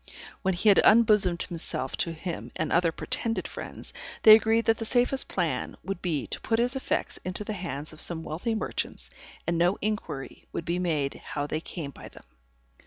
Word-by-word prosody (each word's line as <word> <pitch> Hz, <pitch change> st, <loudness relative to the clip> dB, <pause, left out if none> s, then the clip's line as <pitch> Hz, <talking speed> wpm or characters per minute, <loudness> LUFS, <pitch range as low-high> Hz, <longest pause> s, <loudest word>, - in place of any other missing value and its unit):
When 190 Hz, -2 st, +1 dB
he 210 Hz, +5 st, +3 dB
had 200 Hz, -, +7 dB
unbosomed 210 Hz, -6 st, +5 dB
himself 160 Hz, -6 st, -2 dB
to 170 Hz, -, 0 dB
him 165 Hz, +1 st, -6 dB
and 155 Hz, -1 st, -2 dB
other 170 Hz, -1 st, +3 dB
pretended 225 Hz, +7 st, -2 dB
friends, -, -, -9 dB, 0.3 s
they 215 Hz, -, +11 dB
agreed 225 Hz, +1 st, +4 dB
that 225 Hz, 0 st, +3 dB
the -, -, -2 dB
safest 250 Hz, +3 st, +2 dB
plan -, -, -2 dB
would 195 Hz, -2 st, -4 dB
be 155 Hz, -9 st, -1 dB
to -, -, -4 dB
put 225 Hz, -, +1 dB
his 245 Hz, +3 st, +2 dB
effects 265 Hz, -, -2 dB
into 185 Hz, +3 st, -3 dB
the 215 Hz, -, -4 dB
hands 155 Hz, -6 st, -5 dB
of 155 Hz, -, -9 dB
some 165 Hz, -2 st, 0 dB
wealthy 185 Hz, +10 st, -2 dB
merchants, 215 Hz, -, -3 dB, 0.3 s
and 170 Hz, -1 st, 0 dB
no 175 Hz, +3 st, +3 dB
inquiry 205 Hz, -10 st, -4 dB
would 165 Hz, -, -4 dB
be 175 Hz, +1 st, -1 dB
made 155 Hz, -6 st, 0 dB
how 145 Hz, -1 st, -3 dB
they 155 Hz, +2 st, -3 dB
came 160 Hz, -5 st, -6 dB
by -, -, -11 dB
them. -, -, -15 dB
180 Hz, 190 wpm, -27 LUFS, 160-220 Hz, 0.3 s, they